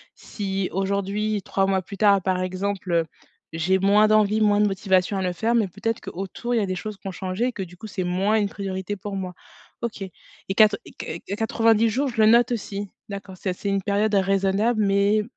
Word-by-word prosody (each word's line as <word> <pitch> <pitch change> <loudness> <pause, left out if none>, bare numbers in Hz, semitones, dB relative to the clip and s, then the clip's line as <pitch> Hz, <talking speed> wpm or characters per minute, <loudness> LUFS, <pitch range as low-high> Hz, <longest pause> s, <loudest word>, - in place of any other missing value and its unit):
Si, 195 -2 -3
aujourd'hui, 200 +2 -1
3 195 0 0
mois 190 -1 +1
plus 195 +2 -9
tard 200 -1 +4
par 185 0 0
exemple, 185 +1 -3
heu, 165 -1 +2 0.5
j'ai 180 +4 +1
moins 205 +2 +5
d'envie, 215 0 +3
moins 205 -1 +4
de 210 - +4
motivation 190 0 +1
à - - -1
le 180 -1 0
faire 225 +6 0
mais 215 -5 +2
peut-être 225 +5 -3
qu'autour 195 +6 -5
il - - +2
y - - +1
a - - 0
des 185 -1 -3
choses 215 +3 -6
qui 195 - -10
ont - - -3
changé 185 +4 -2
et 255 - 0
que 195 - -4
du 180 0 -12
coup 220 - -9
c'est 190 -2 -3
moins 190 +5 +1
une 205 -1 0
priorité 195 0 -4
pour 200 +1 -6
moi. 185 -2 -4 0.5
OK 235 -3 -4
et 190 +1 -8
quatre 210 -2 +5
et - - -12
q 165 - -7 0.2
quatre-vingt-dix 225 0 +3
jours 270 +6 0
je 235 -2 -6
le 215 - +6
note 240 +3 +5
aussi. 205 -3 -4 0.2
D'accord 195 -2 -7
ça 185 0 -2
c'est 200 +2 -4
une 195 -1 +1
période 205 +2 0
raisonnable 195 +3 +2
mais, 200 +2 +3
200 Hz, 225 wpm, -24 LUFS, 190-215 Hz, 0.5 s, le